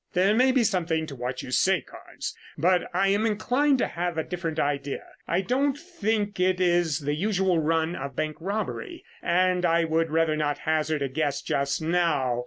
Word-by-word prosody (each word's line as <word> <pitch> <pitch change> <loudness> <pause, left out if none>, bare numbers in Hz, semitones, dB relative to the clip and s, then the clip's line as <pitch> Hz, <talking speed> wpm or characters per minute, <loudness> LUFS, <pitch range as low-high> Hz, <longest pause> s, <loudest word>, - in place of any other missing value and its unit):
"There 190 +3 +3
may 255 +4 +4
be 255 -2 +3
something 170 -6 0
in 140 -4 -8
what 125 +1 -3
you - - -8
say, - - +3
Carnes, - - -8 0.2
but 180 +3 +2
I 195 +2 +2
am 200 +2 +2
inclined 255 +6 +2
to - - +1
have 175 -1 -3
a 160 - 0
different 170 -3 -4
idea. 140 -1 -1 0.2
I 175 +3 +1
don't 270 +6 +1
think 220 - -2
it 185 0 +2
is 175 -4 +2
the 145 +1 -1
usual 190 +1 +1
run 160 +2 +1
of 140 0 -6
bank 155 +1 -2
robbery, 220 - -4 0.2
and 180 +1 +2
I 170 -1 +3
would 165 0 +1
rather 160 0 +2
not 145 -2 -1
hazard 155 -1 0
a - - 0
guess 145 +1 -2
just 140 +2 -1
now. 155 -8 +1
170 Hz, 190 wpm, -26 LUFS, 155-195 Hz, 0.2 s, may